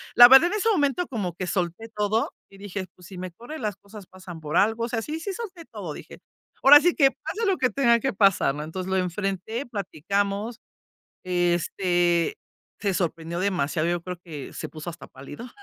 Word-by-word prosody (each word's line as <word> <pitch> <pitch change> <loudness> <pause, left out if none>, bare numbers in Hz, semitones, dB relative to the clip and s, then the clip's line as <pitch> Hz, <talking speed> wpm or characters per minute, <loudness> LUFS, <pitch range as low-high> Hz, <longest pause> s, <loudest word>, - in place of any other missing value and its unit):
la 240 - +11
verdad, 270 +6 +9
en 425 - 0
ese 450 +2 +1
momento 310 0 +1
como 200 -9 -3
que 185 -1 -4
solté 185 +4 -2
todo, 210 +2 0 0.2
y 195 - -16
dije: 200 -2 -5
"Pues, 180 -1 -15
si 185 - -10
me 185 0 -6
corre, 240 - -9
las 210 -4 -2
cosas 200 -1 -13
pasan 185 -3 -11
por 155 +2 -2
algo. 225 +3 +2
O - - -6
sea, 230 -1 -1
sí, 310 +5 -4
sí 390 +4 -4
solté 370 -6 -8
todo", - - -7
dije. - - -11 0.4
"Ahora 290 +2 +10
sí 350 +2 +2
que 275 -3 +5
pase 455 +2 -4
lo 385 - +2
que 255 - +2
tenga 235 -4 +3
que 270 - -1
pasar", 195 -8 +3
¿no? 150 - -5
Entonces, 180 +4 -5
lo 190 - +2
enfrenté, 195 +6 -2
platicamos, 200 - -2 0.6
este, 175 -1 +1 0.4
se 200 -2 0
sorprendió 170 -1 -2
demasiado. 170 -4 0
Yo 175 0 -1
creo 180 0 -5
que 150 -6 -8
se - - -6
puso 155 +2 -7
hasta 165 - -12
pálido, 145 - -10
195 Hz, 200 wpm, -25 LUFS, 175-240 Hz, 0.6 s, la